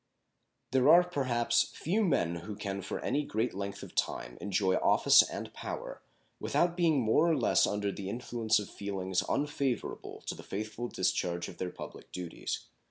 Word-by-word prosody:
There 130 +1 +4
are, 175 +1 +9
perhaps, 130 -9 +1
few 200 +8 0
men 85 - +1
who 100 +5 -7
can 100 -1 -4
for 95 - -4
any 145 +2 0
great 115 -2 -1
length 100 +1 -5
of - - -10
time - - -2
enjoy 95 -2 +1
office - - +6
and - - -5
power - - -6 0.4
without 175 0 +1
being 165 -5 +3
more 120 +9 +3
or 160 - +3
less 125 - +3
under 105 -1 -1
the 95 -1 -6
influence 115 0 0
of 105 - -3
feelings 95 -2 -2
unfavorable 140 -3 -2
to - - -2
the - - -10
faithful 110 +4 -4
discharge 85 -4 -1
of - - -12
their 90 - -2
public - - -10
duties. 90 -2 -5
110 Hz, 165 wpm, -31 LUFS, 95-140 Hz, 0.4 s, are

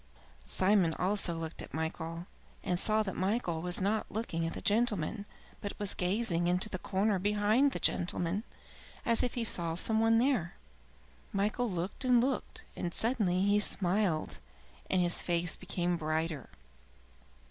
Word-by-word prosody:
Simon 185 -4 +2
also 185 -1 0
looked 165 0 -6
at - - -8
Michael, 160 +1 -4 0.4
and 180 -1 0
saw 215 +2 +3
that 190 -3 -4
Michael 185 -4 -1
was 180 +1 0
not 210 +3 0
looking 165 -7 -2
at - - -4
the - - -5
gentleman, 210 -2 +1 0.3
but 205 - -5
was 205 -2 0
gazing 180 -2 0
into 180 +4 +1
the 185 - -4
corner 195 +1 0
behind 210 +7 +3
the - - -4
gentleman, 175 +3 0 0.6
as 230 -2 +3
if 245 - -1
he 240 - -1
saw 170 -7 +2
some 220 +5 +3
one 225 0 +4
there. 230 - +1 0.8
Michael 215 +4 0
looked 180 +6 -4
and 250 -2 +5
looked, 260 +2 -2
and 170 -1 -4
suddenly 210 -6 +1
he 205 +1 +4
smiled, 190 -4 0 0.5
and 185 -1 +3
his 175 0 +1
face 175 0 0
became 175 -1 -2
brighter. 155 -3 -2
190 Hz, 150 wpm, -32 LUFS, 170-215 Hz, 0.8 s, and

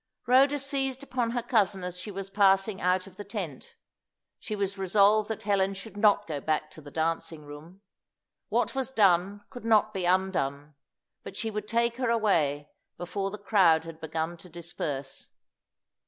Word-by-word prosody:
Rhoda 270 +3 +5
seized 270 -1 -2
upon 250 -4 -1
her 240 0 -2
cousin 205 -6 +1
as 180 0 -5
she 185 - -5
was 195 -1 -6
passing 195 0 +3
out 185 +1 +2
of 190 -2 -15
the 205 - -6
tent. 195 - -6 0.6
She 215 - -5
was 200 -1 -2
resolved 200 +2 +3
that 220 - -4
Helen 195 -1 +1
should 205 +2 -9
not 205 0 +4
go 150 -3 -4
back 155 0 -1
to 155 - -11
the 145 - -11
dancing 160 0 -2
room. 155 +6 -12 0.7
What - - +1
was 265 -1 -2
done 200 -3 +2
could 245 - -9
not 215 -1 +3
be 190 -3 -2
undone. 160 -6 0 0.5
But - - -9
she 225 - -2
would 210 0 -4
take 235 +1 +1
her 255 -2 0
away 155 -11 +1 0.3
before 195 +3 -3
the 210 - -7
crowd 190 -6 +4
had 165 -1 -10
begun 160 +2 -3
to 180 - -13
disperse. 155 -5 -5
195 Hz, 170 wpm, -28 LUFS, 170-215 Hz, 0.7 s, Rhoda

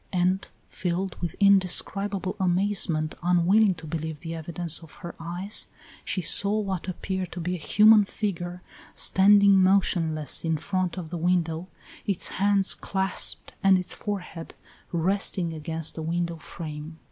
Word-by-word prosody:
And 185 +1 0 0.2
filled 180 +1 -3
with 175 -3 -3
indescribable 195 0 +2
amazement, 180 -4 +2
unwilling 180 +4 +3
to 160 -1 -11
believe 160 -1 -5
the 165 -1 -6
evidence 165 0 -3
of 165 -2 -15
her 170 - -6
eyes, 175 +5 -3 0.4
she 185 - -3
saw 200 +6 +5
what 195 -4 -3
appeared 185 0 -4
to 180 - -6
be 175 +2 -2
a 180 - -4
human 210 +6 +5
figure 180 -4 -4 0.3
standing 200 0 +5
motionless 170 -5 +2
in 160 -1 0
front 185 +2 -2
of 165 -3 -6
the 175 - -4
window, 170 0 0 0.4
its 195 -3 0
hands 200 0 +2
clasped 190 0 -2
and 195 -1 +5
its 180 0 -3
forehead 180 -5 -6 0.4
resting 180 0 0
against 160 0 -3
the 160 - -6
window 170 +1 -2
frame. 155 0 -8
180 Hz, 140 wpm, -26 LUFS, 165-195 Hz, 0.4 s, saw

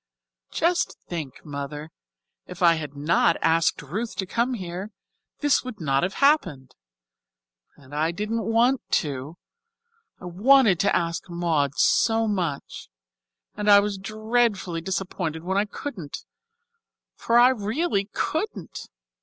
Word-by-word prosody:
"Just 345 +2 0
think, 155 -7 -6
Mother, 145 +1 -6 0.6
if 180 0 -6
I 170 -1 +7
had 150 -3 -5
not 165 +3 +2
asked 165 -1 +2
Ruth 210 - -4
to 190 - -2
come 235 +6 -1
here, 185 0 -6 0.5
this 290 -2 +3
would 255 -4 -8
not 135 -4 +1
have 185 +3 -2
happened. 185 - +2 1.0
And 140 -1 -17
I 155 +2 +1
didn't 215 +6 -3
want 235 +3 +2 0.2
to, 145 +2 -6 0.8
I - - -11
wanted 210 +2 +4
to 200 +4 +2
ask 170 +1 -2
Maud 160 -5 0
so 225 -1 +3
much, 175 -9 -3 0.7
and 210 0 -1
I 200 0 +9
was 200 -1 -2
dreadfully 215 -4 -1
disappointed 180 -3 -3
when 190 +2 0
I 205 - +1
couldn't 205 - -7 0.9
for 230 - +1
I 245 +1 +7
really 220 - -1
couldn't. 315 - -4
190 Hz, 130 wpm, -24 LUFS, 160-225 Hz, 1.0 s, I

